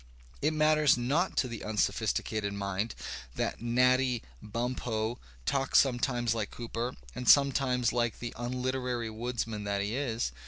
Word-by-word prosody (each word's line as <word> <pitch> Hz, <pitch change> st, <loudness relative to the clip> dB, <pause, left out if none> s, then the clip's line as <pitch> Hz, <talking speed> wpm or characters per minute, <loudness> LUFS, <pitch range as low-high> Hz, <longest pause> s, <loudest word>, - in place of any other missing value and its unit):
It 150 Hz, -, +2 dB
matters 155 Hz, -2 st, +4 dB
not 145 Hz, +10 st, 0 dB
to 130 Hz, -, +3 dB
the 115 Hz, -2 st, -6 dB
un 110 Hz, 0 st, -4 dB
sophisticated 105 Hz, -1 st, 0 dB
mind 100 Hz, +2 st, -2 dB, 0.4 s
that -, -, -2 dB
Natty 125 Hz, +1 st, +3 dB, 0.2 s
Bumppo 115 Hz, 0 st, -2 dB, 0.3 s
talks 135 Hz, -, +2 dB
sometimes 120 Hz, -3 st, +1 dB
like 110 Hz, -2 st, -2 dB
Cooper 120 Hz, +1 st, -4 dB, 0.2 s
and 125 Hz, -, -1 dB
sometimes 135 Hz, -3 st, +4 dB
like 120 Hz, -2 st, 0 dB
the 120 Hz, -1 st, -5 dB
unliterary 125 Hz, -1 st, -2 dB
woodsman 115 Hz, -2 st, -3 dB
that 100 Hz, -1 st, 0 dB
he 105 Hz, +3 st, -2 dB
is. 120 Hz, -, -1 dB
120 Hz, 135 wpm, -30 LUFS, 110-130 Hz, 0.4 s, matters